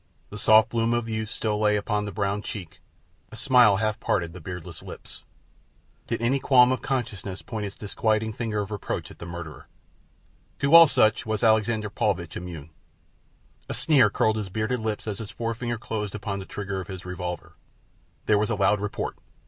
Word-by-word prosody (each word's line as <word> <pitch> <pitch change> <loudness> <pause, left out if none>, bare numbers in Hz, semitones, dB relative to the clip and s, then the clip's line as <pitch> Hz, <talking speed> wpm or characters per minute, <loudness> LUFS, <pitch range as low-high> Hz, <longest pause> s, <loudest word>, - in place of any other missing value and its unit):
The 105 - -6
soft 110 +2 +6
bloom 115 0 +1
of 120 -1 -1
youth 110 -1 -3
still 105 -1 -2
lay 105 0 +3
upon 105 0 -1
the 105 - -5
brown 100 0 -1
cheek, 95 -6 -7 0.5
a - - -9
smile 120 -3 +5
half 110 0 -1
parted 85 -3 -1
the 90 - -10
beardless 90 0 -7
lips. - - -10 0.9
Did 115 0 -2
any 130 +4 +2
qualm 130 -2 +5
of 130 - -1
conscience 110 -8 -3
point 110 -3 -4
its 100 - -9
disquieting 110 +1 -1
finger 105 -2 -2
of 100 +1 -6
reproach 105 - -4
at - - -15
the 85 - -7
murderer? 85 -2 -8 0.9
To 140 +2 +1
all 165 0 +11
such 110 -4 +2
was 110 0 -1
Alexander 110 -1 +2
Paulvitch 95 -6 -1
immune. 80 -3 -7 1.0
A - - -2
sneer 135 -9 +4
curled 110 +2 +1
his 105 -3 -4
bearded 110 +5 -1
lip 110 -1 -3
as 105 -3 -4
his 110 -3 -6
forefinger 115 +1 -3
closed 105 -2 -4
upon 100 -1 -4
the 95 - -7
trigger 100 -1 -4
of 90 - -9
his 95 -2 -8
revolver. 90 -1 -5 0.7
There 105 -1 +4
was 105 - 0
a 115 - +1
loud 100 +1 +3
report. 105 0 -4
105 Hz, 185 wpm, -26 LUFS, 100-115 Hz, 1.0 s, all